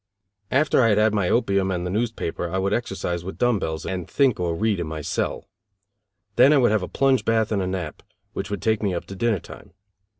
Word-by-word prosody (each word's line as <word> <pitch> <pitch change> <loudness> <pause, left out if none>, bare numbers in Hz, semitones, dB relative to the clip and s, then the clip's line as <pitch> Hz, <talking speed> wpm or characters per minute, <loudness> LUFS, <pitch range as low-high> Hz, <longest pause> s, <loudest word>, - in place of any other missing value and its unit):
After 140 +1 +3
I 115 - +4
had 105 - +3
had 105 0 +3
my 100 -4 +1
opium 100 -5 +1
and 90 -1 -2
the 90 - -3
newspaper 110 -6 -2
I 95 - -2
would 100 +1 0
exercise 95 -7 -2
with 95 - -7
dumb 120 -4 +2
bells 80 -2 -4
and 90 -3 -4
think 135 -7 +2
or 85 -2 -1
read 105 +1 0
in 85 - -3
my 80 0 -5
cell. - - -3 0.9
Then 140 - +7
I 150 - +5
would 120 -5 +4
have 110 -2 +2
a 90 - -4
plunge 135 -2 +2
bath 110 -1 +1
and 100 -2 +1
a 90 - -2
nap, 90 -5 -4 0.3
which - - -4
would 100 -2 -4
take 110 -1 +1
me 100 -4 0
up - - -4
to 95 - -9
dinner 115 +1 +1
time. - - -13
100 Hz, 235 wpm, -23 LUFS, 90-115 Hz, 0.9 s, Then